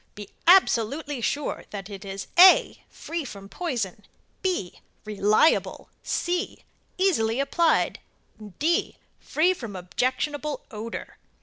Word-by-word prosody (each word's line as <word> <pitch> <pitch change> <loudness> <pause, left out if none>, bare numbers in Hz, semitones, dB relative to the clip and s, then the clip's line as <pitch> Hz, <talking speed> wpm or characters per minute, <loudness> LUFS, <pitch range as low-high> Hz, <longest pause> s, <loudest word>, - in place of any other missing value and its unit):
Be 205 -1 -9 0.2
absolutely 290 - +3
sure 290 +6 -2
that 195 -2 -7
it 200 -1 -9
is 195 0 -6
(a) 370 +2 +6
free 335 -1 -5
from 200 -6 -9
poison; 220 - -4 0.4
(b) 355 - -2 0.3
reliable; 210 +7 +2
(c) 355 +3 -2 0.3
easily 265 - +1
applied; 325 +4 +1 0.6
(d) 330 +3 0 0.2
free 345 +4 +1
from 230 - -8
objectionable 260 +10 -2
odor. 225 +1 -7
255 Hz, 105 wpm, -25 LUFS, 210-335 Hz, 0.6 s, a